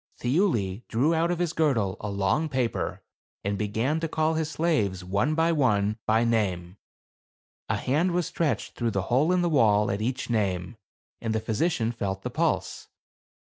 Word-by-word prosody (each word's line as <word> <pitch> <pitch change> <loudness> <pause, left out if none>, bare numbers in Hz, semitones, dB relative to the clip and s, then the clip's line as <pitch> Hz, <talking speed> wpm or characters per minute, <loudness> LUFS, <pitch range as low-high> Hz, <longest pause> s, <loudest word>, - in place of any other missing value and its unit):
Thiuli 120 - +1
drew 135 +8 +2
out 165 +1 +1
of 175 - 0
his 175 -1 -1
girdle 120 - +1
a 105 - -4
long 100 +11 0
paper, 130 -4 -2 0.4
and 100 +1 -1
began 110 +9 -1
to 165 - -2
call 155 0 +1
his 160 -1 -1
slaves, 145 - 0
one 100 +12 0
by 165 +1 +3
one, 110 -8 +1
by 110 +1 +3
name. 95 -6 -1 0.9
A - - +1
hand 155 +8 +1
was 175 -1 0
stretched 155 -2 -1
through 120 -1 -1
the 100 -4 -1
hole 150 +7 +4
in 180 -1 +2
the - - +2
wall 110 -9 +3
at 100 +2 -2
each 125 +3 -2
name, 100 -3 -1 0.5
and 110 -1 -1
the - - +2
physician 115 +2 0
felt 95 -4 -4
the - - -4
pulse. - - -1
115 Hz, 175 wpm, -26 LUFS, 100-160 Hz, 0.9 s, hole